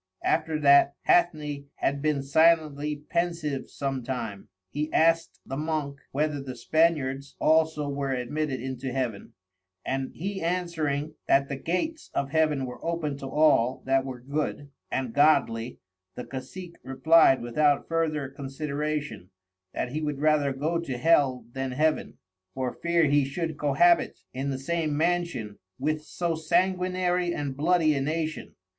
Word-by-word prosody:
After 160 -1 +1
that 140 0 +6
Hathney 150 -5 +2
had 140 0 -1
been 150 -2 0
silently 150 -1 +2
pensive 170 -5 -1
sometime, 130 -7 -4 0.2
he 150 +2 -3
askt 165 +1 +2
the 135 - -5
Monk 150 -2 -2
whether 150 0 -1
the 130 -2 -7
Spaniards 140 -1 +1
also 160 -2 +2
were 140 -1 -2
admitted 135 +2 -2
into 130 +1 -4
Heaven, 120 -5 -3 0.5
and 135 0 -2
he 195 +3 -4
answering 160 -4 -1
that 140 0 +3
the 140 - -2
Gates 185 - -3
of 140 -1 -1
Heaven 155 -4 +2
were 125 - -9
open 165 -4 -2
to 135 - -6
all 135 -4 +3
that 135 0 +2
were 130 -2 -6
Good 145 +1 -3 0.2
and 130 -3 -2
Godly, 125 -6 +3 0.4
the 125 - -5
Cacic 170 +7 -8
replied 135 +1 +5
without 145 +4 +2
further 155 -4 0
consideration, 145 - -4 0.4
that 125 - -3
he 155 +3 -3
would 150 -2 -2
rather 150 -2 +3
go 155 +6 -1
to 135 -7 -4
Hell 135 -4 +3
then 135 0 -3
Heaven, 155 +3 0 0.4
for 130 -2 -2
fear 170 -1 +1
he 145 0 +3
should 160 +4 -3
cohabit 150 +4 +3
in 135 +2 -3
the 135 - -2
same 155 +1 -1
Mansion 165 -11 -1 0.2
with 155 +3 -1
so 170 +1 -2
Sanguinary 180 +1 +1
and 140 -2 -3
Bloody 160 +1 +3
a 140 - -1
Nation. 155 +2 -3
150 Hz, 140 wpm, -27 LUFS, 135-160 Hz, 0.5 s, that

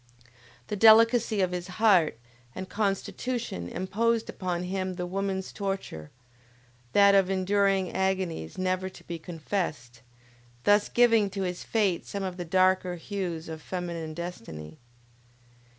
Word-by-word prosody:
The 210 - -4
delicacy 225 0 +6
of 185 -1 +1
his 180 0 -4
heart 190 - +4 0.4
and 185 - -5
constitution 205 - -2
imposed 225 - 0
upon 180 -2 -3
him 185 0 -3
the 180 0 -3
woman's 190 +1 -3
torture, 195 - -4 0.8
that 200 0 +6
of 195 -2 +4
enduring 195 0 +1
agonies 190 - -2
never 185 0 -1
to - - -15
be 170 -1 -6
confessed, 155 - -4 0.6
thus 205 0 +4
giving 230 -4 +4
to 195 0 -3
his 180 -1 -3
fate 200 -6 0
some 200 -1 -4
of 185 -1 -4
the 175 - -4
darker 185 0 +2
hues 175 -3 -4
of 160 -1 -7
feminine 170 -3 -5
destiny. 95 - -7
185 Hz, 130 wpm, -28 LUFS, 175-200 Hz, 0.8 s, delicacy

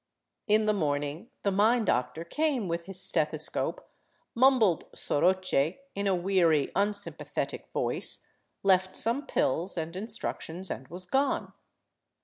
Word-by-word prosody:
In 215 0 +4
the 215 - +3
morning 145 - -2
the 200 - +2
mine 220 +4 +3
doctor 125 +1 0
came 280 - 0
with 170 0 -3
his 195 -1 -7
stethescope, 155 -4 0 0.5
mumbled 235 - +4
" - - -16
soroche 180 -2 +1
" 275 - -41
in 200 0 -1
a 195 - +3
weary, 175 -5 +2
unsympathetic 205 +1 -2
voice, - - 0 0.4
left 190 -1 +3
some 240 +6 +1
pills 170 +8 0
and 165 +1 -3
in 200 +4 -4
structions, 190 -5 -3
and 130 - -14
was 180 +5 -6
gone. 270 +8 0
190 Hz, 135 wpm, -29 LUFS, 165-215 Hz, 0.5 s, In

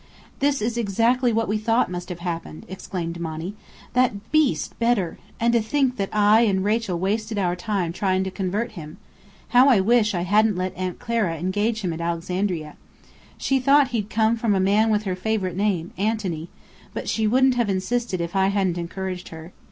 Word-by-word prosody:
"This 280 -4 +1
is 235 +1 -1
exactly 235 +4 +2
what 225 0 0
we 215 +1 0
thought 225 -2 +1
must 180 0 -5
have 175 -1 -6
happened!" 170 -3 -5
exclaimed 175 -3 -5
Monny. 165 +3 -4 0.4
"That 235 -5 0
beast, 310 -3 +2
Bedr! 230 -7 +1 0.2
And 235 +1 +2
to 235 - +4
think 255 +3 0
that 195 -2 -2
Rachel 210 -1 +3
and 170 - -4
I - - +2
wasted 215 +2 -1
our 180 -3 +1
time 180 -2 -2
trying 190 0 0
to 190 - -4
convert 195 +4 -2
him! 160 -6 -9 0.5
How 255 +3 +6
I 240 -7 +5
wish 215 0 +3
I 175 - -1
hadn't 210 +3 +3
let 185 +1 -3
Aunt 185 -1 -3
Clara 230 -8 -1
engage 205 +6 -1
him 180 -4 -2
at 165 - -6
Alexandria! 170 -1 -2 0.6
She 270 0 +1
thought 280 +1 +4
he'd 215 -4 -2
come 220 +1 +2
from 225 -3 +1
a - - +2
man 205 +4 +3
with 210 -1 +1
her 190 -3 -2
favourite 185 -2 -2
name, 190 -4 -1
Antony: 195 -6 -2 0.5
but - - -4
she 220 -1 +1
wouldn't 260 +3 +4
have 240 -4 0
insisted 195 +1 -1
if 170 +3 -4
I 190 0 +3
hadn't 190 -3 0
encouraged 180 +1 -5
her. 160 +2 -10
205 Hz, 190 wpm, -23 LUFS, 180-230 Hz, 0.6 s, How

